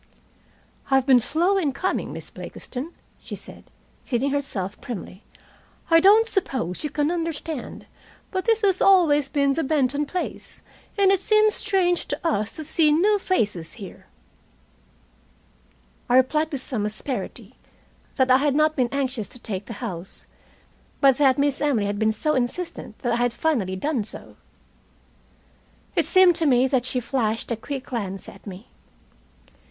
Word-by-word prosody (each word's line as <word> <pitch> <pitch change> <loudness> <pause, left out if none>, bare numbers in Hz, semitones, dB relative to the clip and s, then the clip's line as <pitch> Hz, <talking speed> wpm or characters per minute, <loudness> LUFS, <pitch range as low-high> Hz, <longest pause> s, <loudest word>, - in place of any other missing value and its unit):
"I've 270 -1 +3
been 260 -2 +6
slow 340 - +1
in 295 -7 0
coming, 370 +7 -2
Miss - - -8
Blakiston," 275 +6 -7 0.3
she - - -7
said, - - -12 0.4
seating 270 +2 -1
herself 205 -9 -3
primly. 205 -5 -7 0.7
"I 330 - +8
don't 420 +6 +6
suppose 265 - -2
you 300 - -2
can 295 +2 0
understand, 330 -4 -4 0.5
but 375 -1 -2
this 450 -1 +2
has 390 -3 +2
always 310 -8 +4
been 280 -2 +2
the 325 - -1
Benton 285 0 +1
place, 360 +4 -5 0.3
and 390 -1 +5
it 390 - +3
seems 430 +1 +3
strange 375 -4 +1
to 295 +4 -3
us 215 -8 -1
to 315 - -5
see 310 0 +2
new 405 +7 +3
faces 205 - -1
here." 200 -5 -11 2.0
I 245 - +4
replied, 305 +4 +2
with 275 -3 -2
some 220 -6 -2
asperity, 245 +5 -4 0.6
that 260 -1 +2
I 255 - +7
had 285 -1 +1
not 305 +1 +3
been 250 -3 +1
anxious 265 -6 -2
to - - -10
take 205 -5 -5
the 230 - -6
house, 180 -3 -5 0.7
but 270 -1 +4
that 270 -3 +4
Miss 285 -1 +1
Emily 270 -8 +1
had 205 0 -2
been 220 0 +3
so 305 +8 -1
insistent 255 -2 -3
that 240 - +2
I - - +1
had 245 -1 +1
finally 235 -12 0
done 255 +4 -1
so. 205 - -11 1.6
It - - +2
seemed 370 -2 +6
to 325 - +1
me 255 -1 +4
that 255 -2 0
she 255 - 0
flashed 230 -3 -2
a - - +1
quick 265 +4 -6
glance 200 -8 -5
at - - -13
me. 195 +3 -9
275 Hz, 160 wpm, -24 LUFS, 235-325 Hz, 2.0 s, I